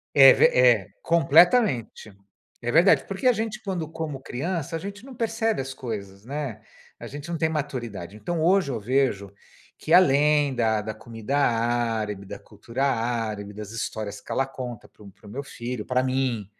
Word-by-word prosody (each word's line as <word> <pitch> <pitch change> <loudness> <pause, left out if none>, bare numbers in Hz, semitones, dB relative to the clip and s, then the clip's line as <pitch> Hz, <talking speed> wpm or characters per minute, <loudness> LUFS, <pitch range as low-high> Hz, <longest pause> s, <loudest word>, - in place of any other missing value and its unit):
é 135 -2 +10
ve - - +4
é, 120 -6 +4
completamente. 165 - +3 0.5
É 120 0 -2
verdade, 175 +5 +5
porque 195 +5 -1
a 250 - +6
gente 225 +1 -4
quando, 175 -6 -3
como 155 -4 -5
criança, 165 +5 -3
a 165 - -2
gente 200 +4 -8
não 270 -2 -11
percebe 225 - -1
as 135 0 -6
coisas, 100 -6 -7
né, 140 -3 -5 0.4
a - - -8
gente 145 +4 -8
não 165 - -2
tem 160 0 +1
maturidade. 120 - -5
Então 165 +10 -3
hoje 180 -4 +3
eu 115 - -3
vejo 105 -4 0 0.5
que 160 - -1
além 145 -3 +5
da 110 -3 +1
da 110 +1 -5
comida 115 +5 -4
árabe, 115 -5 0
da - - -7
cultura 130 +4 -4
árabe, 115 -5 -2
das 105 0 -8
histórias 110 -3 -5
que - - -11
ela 135 - +1
conta 125 -4 -8
para - - -24
o 100 - -12
para 100 +3 -23
o - - -10
meu 135 - -4
filho, 120 -4 -6
para 125 0 +1
mim, 130 -5 -1
130 Hz, 180 wpm, -25 LUFS, 110-160 Hz, 0.5 s, é